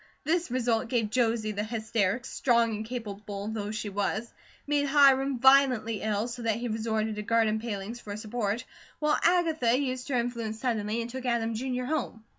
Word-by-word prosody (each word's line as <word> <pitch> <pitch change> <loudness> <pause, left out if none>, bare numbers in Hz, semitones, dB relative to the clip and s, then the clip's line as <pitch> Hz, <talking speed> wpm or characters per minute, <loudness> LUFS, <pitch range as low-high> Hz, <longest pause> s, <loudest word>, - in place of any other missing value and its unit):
This 335 +2 0
result 235 -2 0
gave 230 -4 0
Josie 225 -2 +1
the 210 0 -2
hysterics, 220 +1 -1
strong 235 -3 +2
and 215 - -4
capable 210 -3 -6
though 210 -2 -3
she 215 -1 -4
was; 205 +3 -2 0.3
made 285 0 +1
Hiram 275 -2 +5
violently 255 -4 +4
ill, 215 +1 0
so 245 0 -6
that 225 -2 +1
he 240 +2 -3
resorted 220 -1 -1
to - - -2
garden 220 0 +2
palings 220 0 -5
for 210 - -9
a - - -5
support; 215 0 -2 0.3
while 300 0 +1
Agatha 320 -9 +3
used 255 -1 -3
her 265 - 0
influence 235 -2 -2
suddenly, 225 -2 -1
and 230 - -7
took 260 0 -5
Adam, 230 -1 0
Jr., 250 +2 -2
home. 250 -5 -3
230 Hz, 180 wpm, -28 LUFS, 215-255 Hz, 0.3 s, Hiram